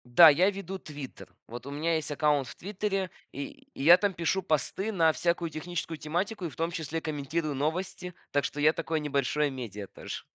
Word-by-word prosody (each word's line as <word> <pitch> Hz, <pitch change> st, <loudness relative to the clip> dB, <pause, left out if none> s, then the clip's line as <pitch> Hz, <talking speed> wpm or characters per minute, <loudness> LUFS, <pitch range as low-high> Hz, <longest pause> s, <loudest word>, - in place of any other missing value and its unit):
Да, 170 Hz, -2 st, +11 dB
я 180 Hz, +7 st, +5 dB
веду 195 Hz, -1 st, -5 dB
"Твиттер". 145 Hz, -6 st, -9 dB, 0.2 s
Вот 120 Hz, +2 st, -8 dB
у 140 Hz, -, -6 dB
меня 160 Hz, +3 st, 0 dB
есть 155 Hz, -1 st, -2 dB
аккаунт 145 Hz, -2 st, +2 dB
в -, -, -9 dB
"Твиттере", 195 Hz, -1 st, -2 dB, 0.2 s
и 140 Hz, +1 st, -7 dB
я 165 Hz, +6 st, +8 dB
там 205 Hz, -2 st, +1 dB
пишу 170 Hz, +3 st, 0 dB
посты 190 Hz, +5 st, 0 dB
на 165 Hz, -5 st, +4 dB
всякую 170 Hz, -1 st, 0 dB
техническую 165 Hz, 0 st, -4 dB
тематику 180 Hz, +7 st, -2 dB
и -, -, -2 dB
в -, -, -14 dB
том 165 Hz, +1 st, 0 dB
числе 160 Hz, 0 st, -3 dB
комментирую 150 Hz, 0 st, -2 dB
новости. 180 Hz, +4 st, -2 dB, 0.2 s
Так 145 Hz, 0 st, +2 dB
что 145 Hz, -, -3 dB
я 155 Hz, +2 st, +5 dB
такое 165 Hz, -1 st, -1 dB
небольшое 145 Hz, 0 st, +1 dB
медиа 110 Hz, -7 st, -6 dB
тоже. -, -, -7 dB
160 Hz, 190 wpm, -29 LUFS, 145-175 Hz, 0.2 s, Да